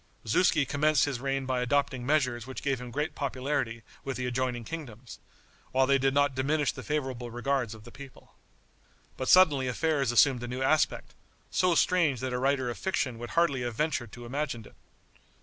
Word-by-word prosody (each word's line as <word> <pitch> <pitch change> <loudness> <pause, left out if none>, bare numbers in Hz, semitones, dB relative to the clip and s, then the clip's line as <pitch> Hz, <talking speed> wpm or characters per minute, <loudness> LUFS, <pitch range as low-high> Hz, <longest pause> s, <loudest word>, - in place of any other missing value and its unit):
Zuski 150 +5 +3
commenced 150 +1 +2
his 140 -4 -3
reign 135 0 -2
by 130 -1 -1
adopting 130 0 0
measures 125 -6 +1
which 130 - -7
gave 135 -3 0
him 125 - -7
great 150 +6 -2
popularity 130 -4 -2 0.2
with 135 -1 -4
the 125 - -3
adjoining 125 -1 -2
kingdoms, 125 -6 -8 0.5
while 130 0 +4
they 135 +1 +3
did 135 +1 +2
not 145 -1 +3
diminish 145 +3 +1
the - - -9
favorable 130 -5 -3
regards 120 -1 -1
of 110 - -14
the 120 - -12
people. 140 0 -13 0.8
But 130 - -3
suddenly 150 -8 +6
affairs 140 0 0
assumed 125 +1 +4
a 120 - -5
new 125 +2 -3
aspect, 155 +3 +1 0.4
so 180 -2 +2
strange 165 -8 +3
that 130 -1 -3
a 125 - -1
writer 135 -1 +1
of - - -8
fiction 130 -11 -1
would 120 0 -6
hardly 145 -7 +3
have 120 -2 -3
ventured 135 -5 -1
to 120 -1 -9
imagine 125 -3 -3
it. - - -16
130 Hz, 185 wpm, -29 LUFS, 125-145 Hz, 0.8 s, suddenly